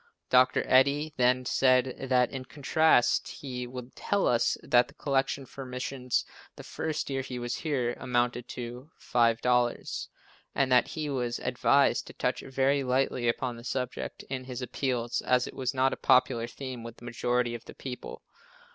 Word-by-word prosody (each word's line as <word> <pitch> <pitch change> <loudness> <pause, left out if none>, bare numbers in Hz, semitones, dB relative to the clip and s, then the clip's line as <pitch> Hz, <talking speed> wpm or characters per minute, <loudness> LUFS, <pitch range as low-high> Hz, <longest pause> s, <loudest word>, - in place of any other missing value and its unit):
Dr. 130 0 +5
Eddy 140 +4 +3
then 125 +1 +3
said 130 +1 +2
that 125 -1 +3
in 130 -2 -6
contrast 150 -1 +3
he 125 -3 -6
would 125 0 -9
tell 200 -1 0
us 120 - +2
that 120 0 +4
the 140 - -18
collection 135 -1 -1
for 135 +2 -9
missions 125 0 -2 0.3
the - - -10
first 155 -2 -3
year 135 0 -1
he 130 -1 -6
was 120 0 -3
here, 130 -6 -1
amounted 120 0 0
to 125 +3 -7
$5, 120 +1 +1 0.5
and 135 -2 +1
that 125 - +5
he 155 -2 -4
was 125 -4 -2
advised 135 +3 +2
to - - -10
touch - - -1
very 135 +1 +1
lightly 125 -1 0
upon 120 +1 -1
the 115 - -11
subject 125 0 -4
in 130 -1 -5
his 125 0 -5
appeals 120 -1 -1
as 125 -1 +2
it - - -8
was 130 -2 -2
not 130 0 +2
a - - -5
popular 125 -2 +3
theme 130 0 -7
with 115 0 -9
the 120 - -13
majority 120 0 0
of 120 - -7
the - - -11
people. 125 -2 -7
125 Hz, 170 wpm, -29 LUFS, 120-135 Hz, 0.5 s, Dr